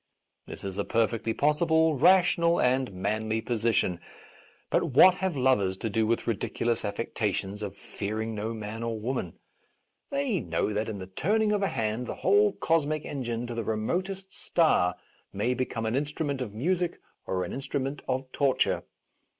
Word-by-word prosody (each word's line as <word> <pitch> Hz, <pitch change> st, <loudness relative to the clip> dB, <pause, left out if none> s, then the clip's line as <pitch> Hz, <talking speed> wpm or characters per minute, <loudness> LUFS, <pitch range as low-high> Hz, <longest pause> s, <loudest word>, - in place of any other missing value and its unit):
This -, -, -9 dB
is 95 Hz, 0 st, -4 dB
a -, -, +1 dB
perfectly 115 Hz, +1 st, 0 dB
possible, 160 Hz, +4 st, +3 dB
rational 170 Hz, +2 st, +4 dB
and 130 Hz, 0 st, +2 dB
manly 110 Hz, +4 st, -1 dB
position. 110 Hz, -6 st, 0 dB, 0.7 s
But -, -, +3 dB
what 185 Hz, -, +8 dB
have 190 Hz, -6 st, 0 dB
lovers 105 Hz, -8 st, +2 dB
to 110 Hz, +2 st, -3 dB
do 110 Hz, +1 st, +1 dB
with 115 Hz, +1 st, 0 dB
ridiculous 115 Hz, +1 st, -1 dB
affectations 105 Hz, -1 st, -2 dB
of 100 Hz, -2 st, -5 dB
fearing 110 Hz, +3 st, -4 dB
no 110 Hz, +1 st, -3 dB
man 110 Hz, 0 st, -6 dB
or 115 Hz, -1 st, -2 dB
woman 125 Hz, +5 st, -3 dB, 0.4 s
} -, -, -49 dB
They 275 Hz, -8 st, 0 dB
know 85 Hz, -, -1 dB
that 110 Hz, +2 st, -1 dB
in 105 Hz, -, -4 dB
the 95 Hz, -, -6 dB
turning 210 Hz, -, +1 dB
of 205 Hz, -1 st, +1 dB
a 195 Hz, -, +2 dB
hand 115 Hz, -, -2 dB
the -, -, -4 dB
whole 205 Hz, +1 st, +4 dB
cosmic 155 Hz, -2 st, 0 dB
en 140 Hz, -3 st, -4 dB
gine 120 Hz, 0 st, -3 dB
to 120 Hz, -, -5 dB
the 115 Hz, 0 st, -2 dB
remotest 185 Hz, -, -2 dB
star 90 Hz, -, +2 dB, 0.4 s
may 110 Hz, +6 st, 0 dB
become 125 Hz, -3 st, -2 dB
an 110 Hz, +2 st, 0 dB
instrument 145 Hz, -1 st, -2 dB
of 120 Hz, -5 st, -3 dB
music 175 Hz, +8 st, 0 dB, 0.3 s
or 95 Hz, -1 st, 0 dB
an 90 Hz, -, -5 dB
instrument 135 Hz, +1 st, -3 dB
of 130 Hz, +1 st, -1 dB
torture. 140 Hz, -2 st, +1 dB
120 Hz, 165 wpm, -28 LUFS, 110-155 Hz, 0.7 s, what